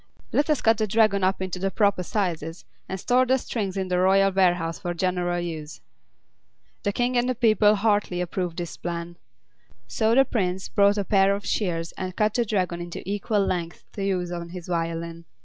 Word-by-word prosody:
Let 290 +2 +1
us 300 - +2
cut 225 0 +4
the 215 - +1
Dragon 215 -2 +3
up 190 0 +1
into 185 -1 -4
the 195 +1 0
proper 200 -2 +2
sizes, 170 -4 -3 0.2
and 190 - -4
store 250 +6 +3
the 260 +1 +3
strings 200 -6 -3
in 190 -1 -1
the 180 -1 0
royal 195 +1 +4
warehouse 175 -3 +1
for 175 -2 -4
general 175 0 0
use." 160 -3 -6 1.0
The 205 - 0
King 245 +4 0
and 245 +1 +2
the 255 - 0
people 215 -3 +4
heartily 205 -3 +1
approved 180 -1 -3
this 175 -3 -5
plan. 170 0 -5 0.7
So 220 - +1
the 270 +1 +6
Prince 185 -6 -2
brought 200 0 +3
a 200 - -1
pair 195 +1 +3
of 200 - -7
shears 170 -5 -1
and 185 -1 -4
cut 210 -1 +1
the 240 0 +1
Dragon 185 -5 -1
into 175 0 -7
equal 205 0 0
lengths 175 -2 -3
to 200 - -4
use 180 -3 -1
on 170 -1 -5
his 175 -1 -8
violin. 165 -1 -3
190 Hz, 195 wpm, -25 LUFS, 175-210 Hz, 1.0 s, the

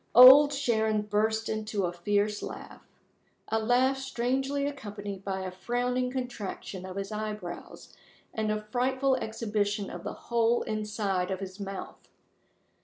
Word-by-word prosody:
Old 265 +4 +10
Sharon 220 -6 +1
burst 220 +1 0
into 215 -2 -1
a 175 - -2
fierce 205 +4 0
laugh - - -8 0.7
a 225 - +1
laugh 250 +4 +2
strangely 270 +2 -1
accompanied 205 -8 -6
by 190 -1 -3
a 185 -1 -4
frowning 245 +6 -1
contraction 225 -7 -5
of 185 - -7
his 195 +1 -4
eyebrows, 210 -4 -6 0.4
and 215 -1 -1
a 215 0 -2
frightful 260 +2 +2
exhibition 210 -3 -2
of - - -7
the - - -4
whole 235 0 +1
inside 210 -4 -1
of 190 -1 -2
his 190 0 -7
mouth. 195 -1 -7
215 Hz, 135 wpm, -29 LUFS, 200-245 Hz, 0.7 s, Old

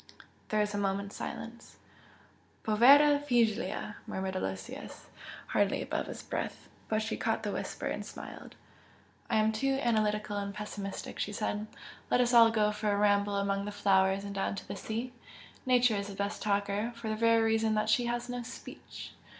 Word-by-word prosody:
There 215 0 +2
was 210 0 -1
a 205 - -1
moment's 200 0 -1
silence. 230 +1 -7 0.9
"Povera 280 +7 +7
figlia!" 225 -6 0
murmured 190 0 -3
Aloysius, 95 - -5 0.4
hardly - - +2
above - - -2
his - - -7
breath, - - -4 0.2
but 215 0 +1
she 225 - -2
caught 225 0 -1
the 205 - -1
whisper, - - -4
and - - -2
smiled. - - -9 0.7
"I - - +1
am 215 0 +4
too 270 +5 0
analytical 215 -4 +1
and 200 0 -4
pessimistic," 205 -2 -6
she 210 - -1
said 210 0 -2 0.4
"Let - - +3
us 245 0 +3
all 230 -1 +8
go 215 -2 +2
for 210 0 -1
a 200 - +1
ramble 205 0 +3
among 200 0 0
the 205 - -4
flowers 195 -1 +3
and 200 0 -5
down 195 0 -1
to 195 - -8
the 200 - -5
sea! 230 +5 -4 0.5
Nature 245 -3 +4
is 200 0 -3
the 200 - -7
best 200 +1 -3
talker, 205 +2 0
for 230 -1 -7
the 215 - 0
very 230 0 +4
reason 225 0 +2
that 215 0 +1
she 245 +2 +3
has 240 0 -2
no 245 0 -4
speech!" 245 +1 -9
215 Hz, 175 wpm, -31 LUFS, 200-230 Hz, 0.9 s, all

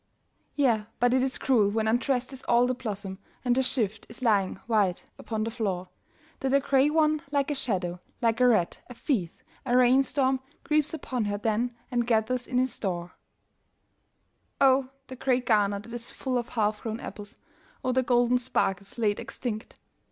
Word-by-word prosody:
Yea, 235 -7 +2
but 245 0 +3
it 260 - +3
is 265 0 0
cruel 225 -7 +3
when 220 +1 0
undressed 245 +3 0
is 265 - -8
all 240 +1 +5
the 255 - +1
blossom, 200 -5 -5 0.3
And 245 -1 +3
her 265 - +3
shift 220 -5 -1
is 235 +3 -9
lying 205 -5 +2
white 205 -6 +1
upon 220 -1 -3
the 225 - -2
floor, 190 -6 -2 0.5
That 270 0 +1
a - - +6
grey 275 +1 +3
one, 310 -1 +2
like 285 0 0
a - - +2
shadow, 185 -10 -2 0.2
like 230 0 +1
a 250 - +6
rat, 210 -8 +2
a 245 - -9
thief, 220 - -1 0.3
a 250 -1 +2
rain 255 +2 +6
storm 265 -1 +1 0.2
Creeps 305 0 +1
upon 255 -6 -3
her 205 0 -1
then 225 +3 0 0.2
and 240 -1 0
gathers 240 +2 +1
in 250 - -1
his 255 -1 +1
store. 175 -5 -3 1.5
Oh, 265 -1 +4 0.2
the 260 - -9
grey 255 0 +1
garner 210 -4 +2
that 220 +4 -10
is 240 0 -5
full 255 -2 -2
of 240 - -6
half 210 -2 0
grown 225 0 -4
apples, 205 +1 -9 0.5
Oh, 255 - +2
the 260 +1 +3
golden 245 0 +3
sparkles 200 -6 -1
laid 210 -3 +1
extinct 220 -3 -5
240 Hz, 180 wpm, -27 LUFS, 215-260 Hz, 1.5 s, a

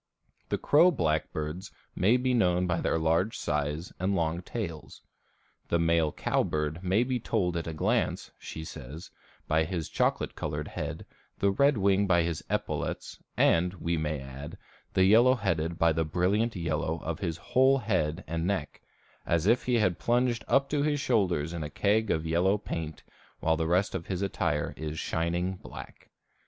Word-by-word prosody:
The - - 0
crow 160 +5 +5
blackbirds 80 - -2 0.3
may 105 +7 +4
be 125 0 0
known 90 -6 +2
by 85 -1 0
their - - +1
large 80 +6 +1
size 75 +3 -2
and 95 +2 0
long 85 0 0
tails. 90 -6 -6 0.6
The 85 - +2
male 85 -2 +2
cowbird 75 +4 -1
may 95 +5 +3
be 125 0 -1
told 95 -6 0
at 85 -1 -3
a 80 - -3
glance, 75 - 0
she 80 - -7
says, 80 +1 -9 0.4
by 80 +1 +3
his 85 -1 -3
chocolate - - 0
colored - - -4
head, - - -5 0.3
the 100 - +2
red 140 +6 +3
wing 100 0 +3
by 85 -2 +4
his 80 -3 -3
epaulettes, - - -3 0.2
and, 90 +2 +3
we 85 -1 -1
may 75 -2 -2
add, 70 +6 -8 0.4
the 95 - +5
yellow 120 +6 +6
headed 85 -7 -1
by 85 -1 +3
the 80 +1 +1
brilliant 95 +8 +1
yellow 80 -2 -1
of 85 -1 -3
his 85 -4 -2
whole 130 +9 +3
head 95 - -1
and 85 +2 -2
neck, 95 -7 -2 0.4
"as 85 0 0
if 115 +4 +3
he 125 - +2
had 95 -6 +2
plunged 120 0 +1
up 140 0 +3
to 145 -1 +1
his 145 0 +1
shoulders 90 - +1
in 85 - -4
a 75 - -4
keg 105 +5 +1
of 80 0 0
yellow 90 +5 +2
paint, 80 -6 -5 0.4
while 80 0 +2
the 80 0 -1
rest 90 +4 +2
of 85 -3 -4
his 95 0 -2
attire 85 -6 -1
is 80 0 -5
shining 85 +4 -1
black." - - -11
85 Hz, 170 wpm, -29 LUFS, 80-100 Hz, 0.6 s, yellow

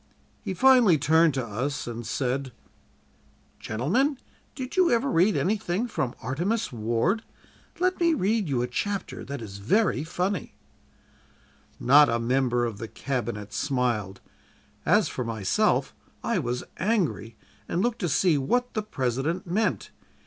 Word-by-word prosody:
He 195 -3 -4
finally 245 -7 +6
turned 160 +1 +3
to 130 -3 -1
us 130 +7 -3
and 120 -1 -6
said: 130 +2 -2 1.1
"'Gentlemen, 205 - 0 0.4
did 260 -1 -6
you 370 -2 +4
ever 240 +3 +2
read 185 +6 +3
anything 205 +2 0
from 130 - -2
"Artemus 175 - -1
Ward?" 120 - 0 0.6
Let 370 +1 +1
me 335 -2 +3
read 210 - 0
you 125 -3 +1
a - - -1
chapter 200 +10 -3
that 140 -3 -6
is 100 -2 -8
very 195 - +2
funny.' 180 +4 -3 1.2
"Not 145 +4 +6
a 115 - +1
member 120 0 +1
of 110 -4 -5
the 115 - -5
Cabinet 115 -6 -4
smiled; 120 -8 -1 0.7
as - - +4
for 125 - -4
myself, 110 -5 0 0.3
I - - 0
was 120 +1 -2
angry, 175 - -1 0.3
and 180 - 0
looked 240 -1 0
to 175 - -1
see 155 0 +3
what 245 - 0
the 215 - -1
President 150 - -2
meant. 180 - -1
145 Hz, 140 wpm, -26 LUFS, -, 1.2 s, finally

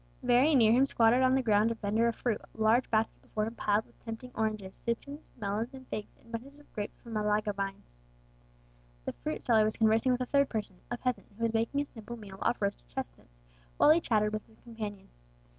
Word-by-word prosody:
Very 270 +6 +5
near 225 -4 +6
him 255 +4 +5
squatted 235 -1 +4
on 260 0 +4
the 265 - +2
ground 215 -1 +4
a 230 - -1
vendor 220 +2 +1
of 230 - 0
fruit, 235 -4 -1
the 220 - -2
large 230 +4 +4
basket 220 0 0
before 215 0 -2
him 225 - -5
piled 210 -1 +1
with - - -26
tempting 230 +2 -7
oranges, 215 -3 -3
citrons, 280 +6 -4
melons, 220 +4 -2
and 260 -1 -12
figs, 210 - -6
and 230 - -19
bunches 270 +5 -7
of 295 - -21
grapes 205 -1 -5
from 230 - -10
Malaga 210 0 +1
vines. 195 - -6 1.1
The - - -3
fruit - - -4
seller 220 -2 +5
was 215 0 0
conversing 225 +3 +4
with 250 0 +1
a - - +1
third 280 +2 +3
person 205 -4 -3
a 240 - -2
peasant 250 0 -2
who 230 - -4
was 230 -1 +1
making 230 +5 +1
a - - -2
simple 235 -2 -9
meal 195 -3 -10
off 240 - +1
roasted 200 - -2
chestnuts, - - -7 0.4
while 300 - +7
he 330 +2 +5
chatted 215 -4 +1
with 215 - -4
his 220 - -22
companion. 215 -4 -7
225 Hz, 220 wpm, -31 LUFS, 210-245 Hz, 1.1 s, while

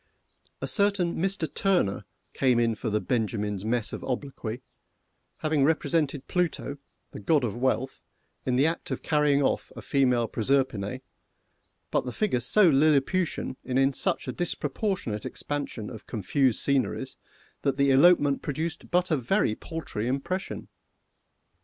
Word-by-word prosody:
A - - -1
certain 200 -5 +1
Mister 195 -3 0
TURNER 175 - 0 0.3
came 125 -3 +3
in 115 -1 +2
for 110 +2 -4
the 105 0 +1
BENJAMIN'S 105 -4 -1
mess 115 0 -1
of - - -6
obloquy, 130 -3 -4 0.8
having 155 -2 +2
represented 150 -2 +1
Pluto, 165 -5 -1 0.3
the - - -8
god 145 +7 +2
of 115 -3 -2
wealth, 130 +1 -1 0.4
in 125 - 0
the 135 +3 +4
act 165 +1 -1
of - - -4
carrying 150 -2 +3
off - - 0
a - - -7
female 125 -4 +2
Proserpine, 130 -2 0 0.9
but - - +1
the 125 - -3
figures 125 - 0
so 210 +8 +6
Lilliputian, 150 0 +2
and 130 0 -2
in 135 +1 +3
such - - +1
a - - -1
disproportionate 150 - -2
expansion 145 -7 -4
of 110 -3 -10
confused 120 +4 +1
sceneries, 135 -1 0 0.5
that 140 -2 0
the 140 -1 +4
elopement 145 0 +5
produced 160 +3 -4
but 180 0 +1
a 155 - +3
very 120 -3 +1
paltry 130 -6 -5
impression. 140 +9 -3
135 Hz, 140 wpm, -27 LUFS, 120-160 Hz, 0.9 s, so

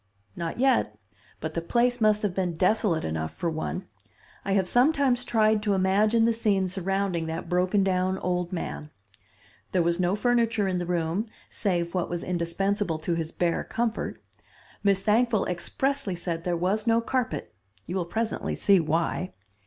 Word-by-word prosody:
"Not 165 -1 -4
yet, 245 - +2 0.4
but 160 0 -4
the 170 - -2
place 240 +6 +1
must 215 -1 +3
have 205 -3 0
been 180 -2 -1
desolate 185 -1 +2
enough 80 0 -3
for 170 - -2
one. 160 +4 -4 0.6
I 195 - -1
have 190 -2 +2
sometimes 255 - +3
tried 220 -3 +2
to 205 -2 +1
imagine 210 +4 +3
the 230 - +3
scene 205 -4 +1
surrounding 190 -2 -1
that 165 +2 -4
broken 185 +3 +2
down 185 0 +1
old 180 -1 -2
man. 165 -4 -5 0.8
There 180 -2 +3
was 170 +1 +1
no 180 +2 +2
furniture 230 -2 +2
in 185 -1 0
the 175 - -3
room, 175 +5 -1 0.2
save 175 -4 -1
what 180 -2 -1
was 175 -1 -3
indispensable 180 +1 -1
to 160 +2 -2
his 165 -1 -2
bare 175 -1 0
comfort. 230 -1 -2 0.6
Miss 195 -1 +2
Thankful 225 0 +3
expressly 265 - -2
said 170 -1 -4
there 175 -1 0
was 195 +6 0
no 230 0 +4
carpet, 250 +1 -2 0.3
you 180 - -5
will 180 -3 0
presently 220 +5 -2
see 200 -2 +4
why. 165 +3 -1
190 Hz, 165 wpm, -27 LUFS, 170-220 Hz, 0.8 s, no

